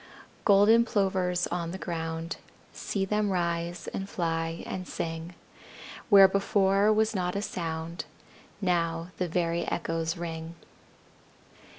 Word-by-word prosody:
Golden 210 +3 +6
Plovers 190 -5 +1
on 170 -1 -2
the 185 - -5
ground, 165 -2 -4 0.4
See 195 -2 -2
them 210 +1 +1
rise, 170 -1 -1
and 195 0 -5
fly, 165 -1 -2
and 185 -1 -5
sing; 165 +1 -5 0.7
Where 195 -3 +9
before 200 +1 +3
was 220 +1 +2
not 180 -2 -1
a 200 - 0
sound 165 -2 -4 0.6
Now 170 -2 0
the 180 - -1
very 170 0 0
echoes 165 0 -2
ring. 165 -1 -5
175 Hz, 115 wpm, -28 LUFS, 165-195 Hz, 0.7 s, Where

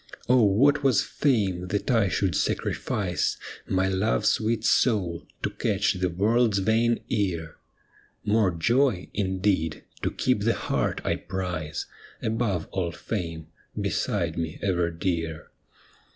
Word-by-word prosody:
Oh, 125 0 +5
what 135 +8 +4
was 135 -5 +3
fame, 100 -10 0
that 100 +7 -1
I 115 -4 +3
should 90 +2 0
sacrifice 90 -1 -1 0.3
My 95 0 +1
love's 95 +3 +2
sweet 110 0 0
soul 95 -9 +2 0.2
to - - 0
catch 105 +1 +1
the 90 -1 -1
world's 105 +4 +2
vain 115 +4 +2
ear 85 -8 -1 0.3
— - - -33
More 110 -4 +4
joy, 115 - +1
indeed, 95 -5 0 0.2
to - - 0
keep - - +1
the - - +2
heart - - -1
I - - 0
prize 90 -5 -4 0.3
Above 110 -6 -1
all 90 -3 -1
fame, 85 -3 -5 0.3
beside - - -1
me 80 0 -3
ever 90 -3 +1
dear. 85 -2 -3
95 Hz, 130 wpm, -26 LUFS, 85-110 Hz, 0.3 s, Oh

